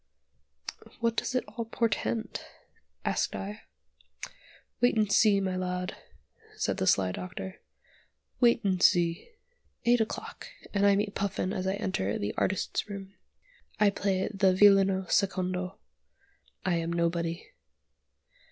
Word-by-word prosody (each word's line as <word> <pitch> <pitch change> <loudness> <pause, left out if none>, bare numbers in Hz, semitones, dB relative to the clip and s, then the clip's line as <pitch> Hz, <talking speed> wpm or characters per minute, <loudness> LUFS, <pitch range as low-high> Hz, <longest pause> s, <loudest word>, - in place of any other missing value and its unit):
"What 230 -1 +1
does 255 - -2
it 255 - +2
all 235 - -5
portend?" 225 0 -1 0.6
asked - - 0
I. 205 +3 -6 1.2
"Wait 245 -1 +4
and 210 -2 +2
see, 205 -2 +5
my 190 -1 -1
lad," 180 0 -3 0.6
said - - -1
the 95 - -1
sly 95 -2 +3
Doctor. 180 - -7 0.8
"Wait 240 -2 +4
and 190 -3 +1
see." 170 - +3 0.6
Eight 240 0 +4
o'clock! 220 - -5 0.3
and 200 0 +3
I 200 - +5
meet 205 0 -1
Puffin 195 -1 -2
as 185 0 -2
I 190 - +1
enter 105 - -1
the 100 - -3
"Artists' 190 +2 -1
Room." 195 -1 -7 0.7
I 210 -1 +5
play 190 -1 0
the 190 -2 +3
violino 195 -1 +5
secondo. 185 -1 0 0.9
I 180 -2 +2
am 165 0 -2
nobody. 170 0 -1
195 Hz, 125 wpm, -29 LUFS, 180-205 Hz, 1.2 s, see